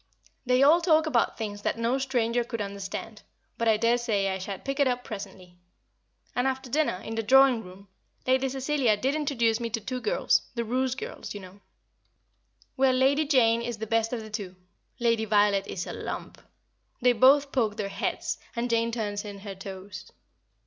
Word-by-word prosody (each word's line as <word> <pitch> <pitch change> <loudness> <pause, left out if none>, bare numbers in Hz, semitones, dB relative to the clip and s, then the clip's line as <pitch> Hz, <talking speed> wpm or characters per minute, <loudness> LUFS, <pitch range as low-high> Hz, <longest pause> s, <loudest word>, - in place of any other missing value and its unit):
They 250 +1 +4
all 320 +5 +6
talk 320 -2 +4
about 255 -7 +1
things 205 -2 -5
that - - -1
no 235 +3 0
stranger 245 -3 0
could 230 -1 -5
understand, 200 +1 -6 0.4
but 230 - +1
I 220 -1 +4
dare 235 +2 +2
say 205 -5 0
I 190 0 -2
shall 195 +1 -5
pick 275 +6 -5
it 280 - +4
up 250 -1 -1
presently. 190 -5 -9 0.8
And 245 +2 +1
after 265 -1 -3
dinner, 305 -7 +1
in 225 - -5
the 225 - -1
drawing 260 +1 +5
room, 190 +2 -13 0.4
Lady 260 +1 +2
Cecilia 265 -4 +1
did 265 +6 0
introduce 255 -7 +1
me 235 -1 -3
to 230 0 -2
two 250 +4 -5
girls - - +2
the 235 - -1
Roose 255 +2 0
girls 260 - -7
you - - -5
know. 190 +1 -13 1.1
Well, 265 -1 +3
Lady 275 +4 +3
Jane 235 -5 +4
is 235 -1 -4
the 220 - -4
best 225 +1 +1
of 245 -2 -3
the 215 0 -10
two; 200 -4 -5 0.4
Lady 230 -2 +2
Violet 205 -2 +3
is 180 - -4
a - - -6
lump. - - -6 0.6
They 250 -1 +4
both 275 +4 +5
poke 225 -5 0
their 205 -2 -2
heads, - - -3 0.2
and 240 +1 -2
Jane 230 0 +1
turns 205 -3 -3
in 200 -2 -8
her 200 -1 -6
toes. 190 0 -9
230 Hz, 190 wpm, -27 LUFS, 205-260 Hz, 1.1 s, all